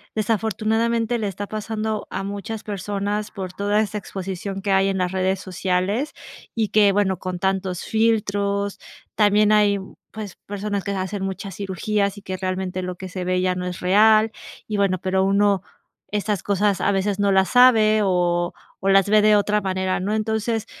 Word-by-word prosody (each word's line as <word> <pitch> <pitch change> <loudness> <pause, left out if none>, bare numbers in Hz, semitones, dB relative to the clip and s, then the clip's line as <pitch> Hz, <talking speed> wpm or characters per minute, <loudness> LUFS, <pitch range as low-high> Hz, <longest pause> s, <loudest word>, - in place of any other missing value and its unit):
desafortunadamente 225 +2 0
le 210 - -1
está 200 +1 -4
pasando 215 0 -3
a 195 +1 -3
muchas 205 +2 -5
personas 205 +1 -3
por 185 -3 -6
toda 205 +1 +1
esta 210 0 -2
exposición 195 0 -5
que 200 - 0
hay 195 0 +4
en 195 - -1
las 180 -1 0
redes 190 0 0
sociales 185 - -1 0.4
y 220 -2 0
que, 205 -2 +5
bueno, 190 -2 +1
con 185 -1 -4
tantos 190 -1 -1
filtros 200 -3 0 0.4
también 210 0 +4
hay, 205 -1 +4 0.3
pues 215 -4 -8
personas 205 0 -3
que - - -5
se 195 - -2
hacen 190 +1 -3
muchas 195 0 -5
cirugías 200 +1 -1
y 200 - -11
que 185 0 -4
realmente 185 0 -3
lo 180 0 -4
que 185 0 -7
se 180 0 -5
ve 185 0 +1
ya 185 0 +1
no 180 0 -4
es 180 - -5
real 215 +4 +5 0.4
y 210 -1 -2
bueno, 195 -2 +2
pero 190 0 +1
uno 200 -1 +3 0.5
estas 205 -2 -1
cosas 200 0 +1
a 200 - +2
veces 195 +1 0
no 200 -1 +3
las 190 0 +3
sabe, 220 -4 +5
o 175 -2 +1 0.3
o 195 - +2
las 195 0 +4
ve 215 0 +6
de 215 0 +5
otra 210 +1 +2
manera, 190 -1 -1
¿no? 200 - -2
Entonces, 220 +1 -1
200 Hz, 180 wpm, -22 LUFS, 190-210 Hz, 0.5 s, ve